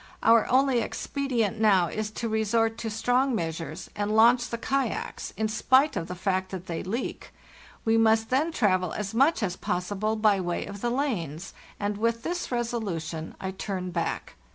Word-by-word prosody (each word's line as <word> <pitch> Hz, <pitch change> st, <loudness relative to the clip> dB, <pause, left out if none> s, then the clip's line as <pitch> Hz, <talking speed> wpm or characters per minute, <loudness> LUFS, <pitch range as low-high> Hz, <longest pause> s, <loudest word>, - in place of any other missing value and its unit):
Our 230 Hz, 0 st, +5 dB
only 260 Hz, -1 st, +4 dB
expedient 240 Hz, -8 st, -2 dB
now 195 Hz, -5 st, +5 dB
is 215 Hz, +5 st, -3 dB
to 230 Hz, +2 st, -4 dB
resort 225 Hz, +1 st, +1 dB
to 225 Hz, -, -3 dB
strong 245 Hz, +4 st, +1 dB
measures 165 Hz, -1 st, -4 dB
and 205 Hz, +1 st, -1 dB
launch 240 Hz, +2 st, +5 dB
the 235 Hz, -, -3 dB
kayaks, 265 Hz, +1 st, -2 dB
in 220 Hz, -, +1 dB
spite 260 Hz, +7 st, +3 dB
of 165 Hz, -, -3 dB
the 180 Hz, -, -5 dB
fact 185 Hz, +1 st, -1 dB
that 185 Hz, -2 st, -6 dB
they 170 Hz, -2 st, -4 dB
leak; 225 Hz, +7 st, -4 dB, 0.5 s
we 225 Hz, 0 st, +3 dB
must 225 Hz, 0 st, +3 dB
then 295 Hz, +6 st, +2 dB
travel 185 Hz, -, +1 dB
as 205 Hz, -1 st, -4 dB
much 270 Hz, +2 st, +3 dB
as 180 Hz, -3 st, -1 dB
possible 205 Hz, +4 st, -2 dB
by 215 Hz, -2 st, +3 dB
way 175 Hz, -1 st, -2 dB
of 200 Hz, 0 st, -8 dB
the 240 Hz, -, 0 dB
lanes, 195 Hz, -, -2 dB, 0.3 s
and 205 Hz, 0 st, -1 dB
with 230 Hz, +1 st, 0 dB
this 350 Hz, -3 st, -3 dB
resolution 195 Hz, -10 st, -3 dB
I 190 Hz, -, -3 dB
turn 190 Hz, -1 st, -4 dB
back. 170 Hz, -1 st, -3 dB
215 Hz, 175 wpm, -27 LUFS, 185-235 Hz, 0.5 s, Our